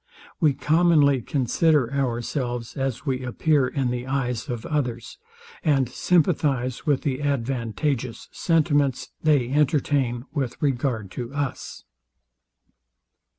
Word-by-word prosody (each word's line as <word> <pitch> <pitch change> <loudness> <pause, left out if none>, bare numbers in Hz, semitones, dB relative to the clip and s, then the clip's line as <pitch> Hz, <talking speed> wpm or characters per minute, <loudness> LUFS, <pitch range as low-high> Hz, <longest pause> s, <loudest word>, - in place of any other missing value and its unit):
We 155 -6 +4
commonly 150 -3 +3
consider 140 +1 +1
ourselves 120 -2 -2
as 135 0 -3
we 130 -2 -1
appear 135 +2 +2
in 130 -2 -1
the 125 +1 -4
eyes 130 -1 -2
of 120 -3 -4
others, 125 -6 -3 0.4
and 140 -5 +3
sympathize 140 -3 +1
with 145 -3 +2
the 140 -2 -1
advantageous 130 -1 -2
sentiments 145 -5 +1
they 145 -6 +3
entertain 140 -4 +1
with 135 -6 -3
regard 125 - -1
to 120 +3 -6
us. 145 -2 -4
135 Hz, 110 wpm, -24 LUFS, 125-145 Hz, 0.4 s, We